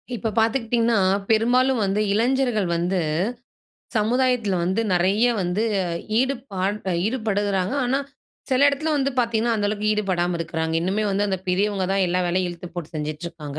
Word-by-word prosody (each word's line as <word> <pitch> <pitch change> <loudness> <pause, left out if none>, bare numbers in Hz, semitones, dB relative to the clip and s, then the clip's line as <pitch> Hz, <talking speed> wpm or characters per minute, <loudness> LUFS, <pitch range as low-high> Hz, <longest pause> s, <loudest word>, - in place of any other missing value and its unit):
இப்போ 225 0 -2
பார்த்துக்கிட்டிங்கன்னா, 230 -1 +2 0.3
பெரும்பாலும் 245 +3 +3
வந்து, 195 +2 0
இளைஞர்கள் 240 -2 +1
வந்து 175 +2 0 1.0
சமுதாயத்துல 235 -1 +1
வந்து 190 +5 0
நெறைய 190 +6 +3
வந்து 180 +3 -1 0.6
ஈடுபாடு 235 -7 -1 0.3
ஈடுபடுகிறாங்க. 205 -4 -1
ஆனா, 255 +2 +1 0.5
சில 260 0 +2
இடத்துல 290 +3 -1
வந்து 275 -1 +1
பார்த்தீங்கன்னா 235 -1 +1
அந்த 205 -1 0
அளவுக்கு 210 0 -1
ஈடுபடாம 180 -4 0
இருக்கறாங்க. 160 -1 -2
இன்னுமே 195 +5 0
வந்து 200 +1 +1
அந்த 190 -1 -1
பெரியவங்க 195 +1 +1
தான் 195 -1 +2
எல்லா 180 +1 0
வேலையும் 180 +1 0
இழுத்து 175 0 -8
போட்டு 175 -3 -6
செஞ்சுட்டுருக்காங்க. 155 0 -5
205 Hz, 135 wpm, -23 LUFS, 180-235 Hz, 1.0 s, பெரும்பாலும்